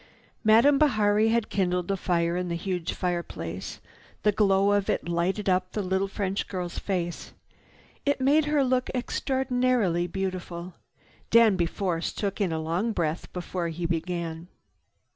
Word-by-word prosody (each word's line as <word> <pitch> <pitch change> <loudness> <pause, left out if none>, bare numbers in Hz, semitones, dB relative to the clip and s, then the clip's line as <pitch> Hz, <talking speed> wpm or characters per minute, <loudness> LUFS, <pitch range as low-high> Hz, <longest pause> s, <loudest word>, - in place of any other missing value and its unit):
Madame 235 +6 +6
Bihari 215 -6 +3
had 230 -1 +1
kindled 180 -1 0
a - - +1
fire 170 -2 0
in 180 0 -2
the 170 - -2
huge 180 -1 -2
fireplace. 175 -1 -4 0.4
The 210 - +4
glow 200 -1 +3
of 205 -1 +1
it - - -1
lighted 175 +4 -1
up 185 -1 +1
the 210 - -1
little 190 +1 0
French 195 0 -2
girl's 180 -3 -4
face. 175 -3 -3 0.7
It 285 -1 +1
made 290 +4 +4
her 295 -1 +2
look 255 -1 +1
extraordinarily 250 - 0
beautiful. 180 -1 -4 0.6
Danby 210 -7 +5
Force 175 -2 -2
took 200 0 -3
in 190 -4 +1
a 160 - -1
long 175 +8 -1
breath 165 -3 -2
before 180 -1 -3
he 165 +1 -4
began. 170 0 -3
190 Hz, 145 wpm, -27 LUFS, 175-215 Hz, 0.7 s, Madame